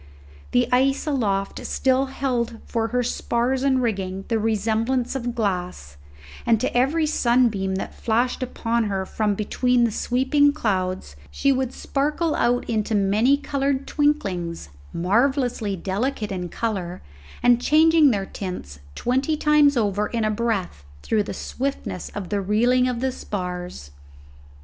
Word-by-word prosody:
The 125 Hz, -, +2 dB
ice 270 Hz, +3 st, +2 dB
aloft 205 Hz, -10 st, -1 dB
still 265 Hz, +1 st, +1 dB
held 250 Hz, -4 st, -2 dB
for 225 Hz, -1 st, -1 dB
her 245 Hz, +2 st, 0 dB
spars 245 Hz, +2 st, -1 dB
and 260 Hz, -2 st, +2 dB
rigging 195 Hz, -4 st, -2 dB
the 225 Hz, -2 st, +1 dB
resemblance 225 Hz, +4 st, 0 dB
of 245 Hz, -2 st, -3 dB
glass, 180 Hz, -, -3 dB, 0.5 s
and 230 Hz, -2 st, +3 dB
to -, -, -2 dB
every 285 Hz, +6 st, +2 dB
sunbeam 235 Hz, -9 st, +2 dB
that 190 Hz, -, -4 dB
flashed 240 Hz, +4 st, 0 dB
upon 235 Hz, -2 st, -1 dB
her 195 Hz, -2 st, -2 dB
from 210 Hz, +1 st, -1 dB
between 245 Hz, +4 st, +1 dB
the 230 Hz, -, +2 dB
sweeping 265 Hz, +6 st, +2 dB
clouds 185 Hz, -, -2 dB
she 275 Hz, -, +1 dB
would 260 Hz, -2 st, 0 dB
sparkle 300 Hz, +5 st, -1 dB
out 245 Hz, +1 st, +1 dB
into 220 Hz, -1 st, 0 dB
many 210 Hz, +7 st, +3 dB
coloured 275 Hz, -1 st, -1 dB
twinklings, 190 Hz, -, -1 dB, 0.2 s
marvellously 230 Hz, +2 st, +1 dB
delicate 210 Hz, +4 st, -2 dB
in 180 Hz, -2 st, -4 dB
colour, 185 Hz, -4 st, -3 dB, 0.4 s
and 245 Hz, 0 st, +5 dB
changing 315 Hz, +1 st, +5 dB
their 200 Hz, -5 st, 0 dB
tints 180 Hz, -, -7 dB, 0.2 s
twenty 265 Hz, +5 st, 0 dB
times 295 Hz, -2 st, +4 dB
over 210 Hz, -2 st, +1 dB
in 230 Hz, -2 st, -1 dB
a 215 Hz, -, +1 dB
breath 205 Hz, -, -2 dB, 0.2 s
through 220 Hz, -, +1 dB
the 205 Hz, -, -4 dB
swiftness 270 Hz, -8 st, -4 dB
of 195 Hz, -3 st, -5 dB
the 205 Hz, -1 st, 0 dB
reeling 240 Hz, +6 st, +2 dB
of 245 Hz, -2 st, -2 dB
the 265 Hz, 0 st, 0 dB
spars. 180 Hz, -, -6 dB
235 Hz, 140 wpm, -23 LUFS, 195-265 Hz, 0.5 s, and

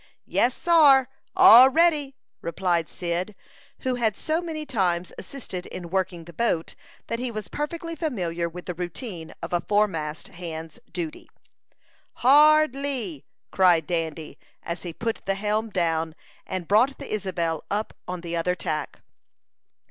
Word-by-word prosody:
"Yes, 245 Hz, +1 st, +1 dB
sar 285 Hz, -7 st, +5 dB, 0.3 s
all 250 Hz, +4 st, +9 dB
ready!" 295 Hz, -2 st, +2 dB, 0.3 s
replied 170 Hz, -1 st, 0 dB
Cyd, 180 Hz, +3 st, -3 dB, 0.5 s
who 260 Hz, -, 0 dB
had 225 Hz, -4 st, 0 dB
so 320 Hz, +2 st, -1 dB
many 315 Hz, -3 st, -5 dB
times 180 Hz, -9 st, -1 dB
assisted 190 Hz, -10 st, -7 dB
in 175 Hz, -2 st, -8 dB
working 185 Hz, -3 st, -1 dB
the 170 Hz, +1 st, -13 dB
boat, 170 Hz, -4 st, 0 dB, 0.3 s
that 230 Hz, -, -3 dB
he 250 Hz, 0 st, -2 dB
was 215 Hz, -4 st, -5 dB
perfectly 330 Hz, -, -4 dB
familiar 175 Hz, -, -2 dB
with 175 Hz, +1 st, -9 dB
the 180 Hz, -, -3 dB
routine 175 Hz, 0 st, -6 dB
of -, -, -5 dB
a 175 Hz, -, +2 dB
foremast 165 Hz, -8 st, -1 dB
hand's 165 Hz, -2 st, -8 dB
duty. 170 Hz, -3 st, -6 dB, 0.8 s
"Hard 300 Hz, +2 st, +6 dB
lee!" 260 Hz, -, -3 dB, 0.3 s
cried 175 Hz, -4 st, +4 dB
Dandy, 160 Hz, -2 st, -3 dB, 0.2 s
as 170 Hz, +1 st, -5 dB
he 175 Hz, -, -5 dB
put 225 Hz, +7 st, -3 dB
the 195 Hz, -, +1 dB
helm 215 Hz, +2 st, -1 dB
down, 165 Hz, -4 st, 0 dB, 0.3 s
and 185 Hz, -3 st, -4 dB
brought 240 Hz, +7 st, +3 dB
the -, -, -6 dB
Isabel 175 Hz, -6 st, -2 dB
up 210 Hz, +2 st, -2 dB
on 180 Hz, -1 st, -4 dB
the 170 Hz, 0 st, -4 dB
other 180 Hz, +2 st, 0 dB
tack. 155 Hz, -4 st, -4 dB
190 Hz, 145 wpm, -25 LUFS, 170-255 Hz, 0.8 s, all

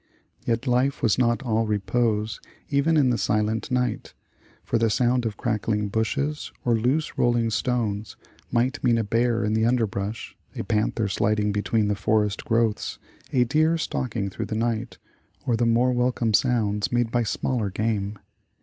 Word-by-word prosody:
Yet 115 Hz, +2 st, 0 dB
life 130 Hz, +1 st, +1 dB
was 115 Hz, 0 st, +3 dB
not 120 Hz, +1 st, +2 dB
all 115 Hz, -2 st, 0 dB
repose 105 Hz, +1 st, 0 dB, 0.3 s
even 150 Hz, +2 st, +2 dB
in 135 Hz, -4 st, +4 dB
the 120 Hz, -, 0 dB
silent 105 Hz, +1 st, 0 dB
night, 125 Hz, -3 st, -1 dB, 0.5 s
for 115 Hz, -, 0 dB
the 115 Hz, 0 st, +2 dB
sound 125 Hz, +1 st, +2 dB
of 105 Hz, -, -6 dB
crackling 105 Hz, -3 st, -1 dB
bushes, 140 Hz, +8 st, -1 dB
or 120 Hz, -, +3 dB
loose 130 Hz, +8 st, 0 dB
rolling 120 Hz, -1 st, +2 dB
stones, 110 Hz, -4 st, -1 dB, 0.4 s
might 130 Hz, +4 st, 0 dB
mean 120 Hz, -2 st, +3 dB
a 115 Hz, -, +1 dB
bear 115 Hz, +2 st, +1 dB
in 105 Hz, -, 0 dB
the 110 Hz, +1 st, +2 dB
underbrush, 110 Hz, -3 st, -2 dB, 0.2 s
a -, -, -3 dB
panther 110 Hz, +1 st, 0 dB
sliding 105 Hz, +2 st, +1 dB
between 105 Hz, +1 st, 0 dB
the 105 Hz, -, +1 dB
forest 105 Hz, 0 st, 0 dB
growths, 115 Hz, -2 st, 0 dB, 0.3 s
a 125 Hz, -, +4 dB
deer 155 Hz, +6 st, +2 dB
stalking 110 Hz, -10 st, -2 dB
through -, -, -4 dB
the 110 Hz, -, -3 dB
night, 115 Hz, +1 st, -2 dB, 0.5 s
or 120 Hz, -, +2 dB
the 120 Hz, +1 st, +1 dB
more 120 Hz, +2 st, +3 dB
welcome 120 Hz, -2 st, +1 dB
sounds 105 Hz, -4 st, +1 dB
made 120 Hz, -1 st, +1 dB
by 120 Hz, -, +2 dB
smaller 115 Hz, -1 st, -1 dB
game. 105 Hz, 0 st, -2 dB
115 Hz, 160 wpm, -25 LUFS, 105-125 Hz, 0.5 s, in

